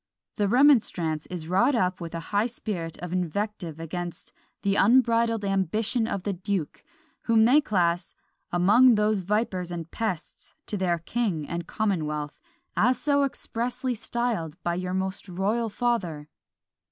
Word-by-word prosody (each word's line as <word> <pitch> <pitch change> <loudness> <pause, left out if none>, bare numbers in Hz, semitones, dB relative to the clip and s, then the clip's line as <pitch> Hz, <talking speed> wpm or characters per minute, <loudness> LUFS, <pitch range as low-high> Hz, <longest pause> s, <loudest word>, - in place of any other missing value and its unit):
The 205 -2 +2
remonstrance 205 - +3
is 175 -3 -6
wrought 235 - +3
up 185 -5 0
with 170 0 -6
a - - -2
high 205 +3 +3
spirit 190 -9 -5
of 180 0 -4
invective 180 -2 -3
against 175 +1 -6 0.3
"the 200 0 +2
unbridled 230 -1 +3
ambition 215 +5 0
of 200 -4 -3
the 205 - -1
duke," 185 -3 -3 0.4
whom 225 -1 +5
they 275 +6 +6
class 175 - 0 0.4
"among 215 +8 +6
those 210 0 +2
vipers 190 -2 -1
and 170 -2 -6
pests 190 -8 -4
to - - -3
their 180 -3 +1
king 170 -3 -2
and 170 0 -4
commonwealth, 150 -8 -2 0.4
as 250 +4 +3
so 285 -1 +2
expressly 250 -1 -2
styled 220 -8 -2
by 175 - 0
your 180 +1 -3
most 190 +1 -2
royal 210 +6 0
father." 190 -11 -1
200 Hz, 140 wpm, -26 LUFS, 175-230 Hz, 0.4 s, they